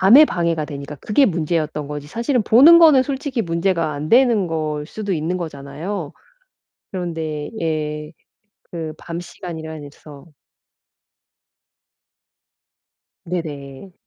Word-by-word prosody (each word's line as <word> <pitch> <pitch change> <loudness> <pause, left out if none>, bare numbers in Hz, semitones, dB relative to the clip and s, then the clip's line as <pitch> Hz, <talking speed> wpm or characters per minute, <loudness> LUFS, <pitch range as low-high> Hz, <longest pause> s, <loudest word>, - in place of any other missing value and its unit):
잠에 240 +11 +8
방해가 170 - -1
되니까 145 0 -7
그게 215 - +2
문제였던 155 -4 -1
거지 145 -1 -6
사실은 235 - 0
보는 290 +11 +8
거는 305 -6 +7
솔직히 270 -3 -3
문제가 170 -2 0
안 145 +2 -5
되는 235 -6 +4
걸 155 -2 -3
수도 205 0 -4
있는 165 +2 -1
거잖아요. 155 +2 -5 0.8
그런데 160 -5 -4
예. 150 -1 -3 0.6
그 160 -2 -4
밤 170 0 -6
시간이라는 160 -4 -8
서 145 0 -14 3.0
네네. 155 -1 -6
165 Hz, 235 characters per minute, -20 LUFS, 150-195 Hz, 3.0 s, 잠에